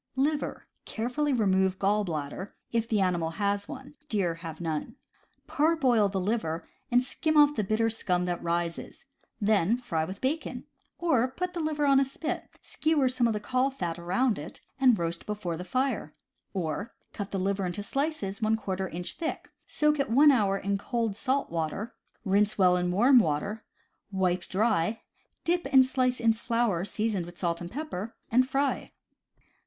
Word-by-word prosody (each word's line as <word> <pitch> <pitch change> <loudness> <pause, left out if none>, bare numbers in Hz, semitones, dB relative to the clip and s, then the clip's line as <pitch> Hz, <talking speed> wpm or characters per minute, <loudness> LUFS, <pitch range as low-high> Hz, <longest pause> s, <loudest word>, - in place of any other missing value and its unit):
Liver. 290 +3 -1
— - - -49
Carefully 250 +6 -1
remove 190 -5 +2
gall 205 +2 +2
bladder, 160 +2 -5 0.2
if 230 0 0
the 215 - +2
animal 175 -3 +1
has 200 0 0
one 265 +2 -9
— 290 - -39
deer 190 -6 +1
have 165 -1 -8
none. 160 -3 -3 0.5
Parboil 270 -9 +3
the 195 -1 -2
liver, 180 -5 -2 0.2
and 245 +1 +4
skim 310 +4 0
off 295 0 +7
the 215 - 0
bitter 215 +3 +1
scum 180 -5 0
that 175 -1 -2
rises; 170 0 -3 0.3
then 210 0 +3
fry 180 -11 -2
with 190 +5 -6
bacon; 295 +5 -2 0.3
or, 285 -8 +2
put 360 +7 -4
the 345 - -4
liver 310 -2 0
on 275 -1 +5
a - - +4
spit, 275 +4 -4
skewer 310 -4 +1
some 250 -1 +2
of 225 - +1
the 210 - -2
caul 255 +5 +1
fat 175 -10 -4
around 190 - +1
it, 150 +4 -9 0.2
and 255 -4 +5
roast 170 0 -3
before 205 -5 -3
the 175 - -6
fire; 255 +9 -1 0.4
or, 185 +3 -3 0.2
cut 205 -1 -5
the 195 - -3
liver 195 +1 0
into 190 +3 -4
slices 275 -7 -2 0.2
| 190 -1 -2
inch 175 +2 -5
thick, 325 -1 -4 0.2
soak 300 0 +1
it 275 - 0
one 285 +6 +7
hour 205 -7 +2
in 200 0 -1
cold 230 -2 -1
salt 265 +2 0
water, 165 +7 -3 0.3
rinse 205 +2 +2
well 180 -2 +5
in 180 0 0
warm 245 +8 +6
water, 200 +5 -1 0.5
wipe 185 -2 0
dry, 215 0 +1 0.4
dip 345 -4 0
each 265 -2 +7
slice 255 -1 0
in 230 -1 +4
flour 230 -5 0
seasoned 205 -3 -1
with 175 0 -12
salt 170 -2 -1
and 175 - -5
pepper, 230 - -5 0.2
and 255 +3 +4
fry. 275 +1 -1
210 Hz, 175 wpm, -28 LUFS, 180-260 Hz, 0.5 s, off